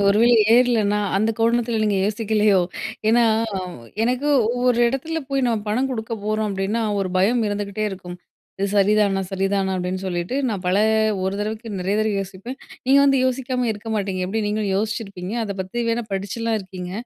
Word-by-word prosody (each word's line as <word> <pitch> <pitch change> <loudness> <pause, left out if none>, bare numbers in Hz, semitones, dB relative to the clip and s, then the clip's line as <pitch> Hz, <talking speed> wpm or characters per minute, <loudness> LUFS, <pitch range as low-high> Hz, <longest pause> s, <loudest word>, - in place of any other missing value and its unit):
ஒரு 200 +1 +4
வேள 240 +1 +5 0.2
ஏறலன்னா, 230 -4 +3 0.2
அந்த 215 +3 +2
கோணத்துல 230 0 +1
நீங்க 205 -2 +1
யோசிக்கலையோ! 210 -1 +2 0.5
ஏன்னா, 235 +2 +5 0.8
எனக்கு 255 +5 0 0.2
ஒவ்வொரு 245 0 +1
இடத்துல 295 +6 -2
போய் 275 -1 0
நம்ம 230 -2 +1
பணம் 250 +6 +1
கொடுக்க 225 -2 -4
போறோம் 215 0 0
அப்பிடின்னா, 200 +4 -1 0.2
ஒரு 190 - -1
பயம் 225 +6 +3
இருந்துக்கிட்டே 205 +1 -3
இருக்கும். 180 -2 -8 0.4
இது 200 - 0
சரிதானா 200 -1 +3
சரிதானா 195 0 0
அப்பிடின்னு 185 +1 -3
சொல்லிட்டு, 175 +6 -2
நான் 195 -4 -4
பல 180 +1 +2 0.5
ஒரு 190 +1 -1
தறவைக்கு 215 0 -4
நெறைய 195 +3 0
தறவை 215 -1 0
யோசிப்பேன். 195 +7 -7 0.3
நீங்க 275 +2 +6
வந்து 275 -1 +4
யோசிக்காம 255 -1 -1
இருக்க 215 +2 -8
மாட்டீங்க. 195 -2 -2
எப்படி 220 +3 -1
நீங்களும் 210 -2 -1
யோசிச்சிருப்பீங்க, 200 -2 -3
அத 200 -2 -4
பத்தி 235 +6 -4
வேணா 235 +1 -1
படிச்சுலாம் 220 +4 -2
இருக்கீங்க. 185 -1 -8
215 Hz, 160 wpm, -22 LUFS, 195-235 Hz, 0.8 s, நீங்க